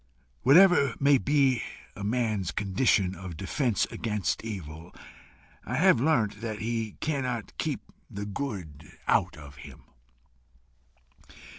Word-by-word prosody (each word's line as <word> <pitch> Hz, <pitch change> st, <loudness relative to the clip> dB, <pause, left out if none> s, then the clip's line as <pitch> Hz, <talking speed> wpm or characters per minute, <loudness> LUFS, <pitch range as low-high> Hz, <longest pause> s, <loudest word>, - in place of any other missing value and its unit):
Whatever 145 Hz, -2 st, +6 dB
may 140 Hz, -1 st, +5 dB
be 135 Hz, -4 st, +2 dB, 0.3 s
a 100 Hz, -, -7 dB
man's 110 Hz, -4 st, 0 dB
condition 95 Hz, -1 st, +1 dB
of 90 Hz, -3 st, -8 dB
defence 115 Hz, -, 0 dB
against 105 Hz, -3 st, -2 dB
evil, 85 Hz, -6 st, -7 dB, 0.7 s
I 125 Hz, -, -4 dB
have 160 Hz, -4 st, +4 dB
learnt 110 Hz, -9 st, +1 dB
that 110 Hz, -2 st, -4 dB
he 115 Hz, -1 st, -3 dB
cannot 130 Hz, -7 st, -2 dB
keep -, -, -2 dB, 0.3 s
the 100 Hz, +1 st, -6 dB
good 95 Hz, -, -6 dB
out -, -, +2 dB
of 70 Hz, -2 st, -12 dB
him. -, -, -12 dB
110 Hz, 115 wpm, -28 LUFS, 95-130 Hz, 0.7 s, Whatever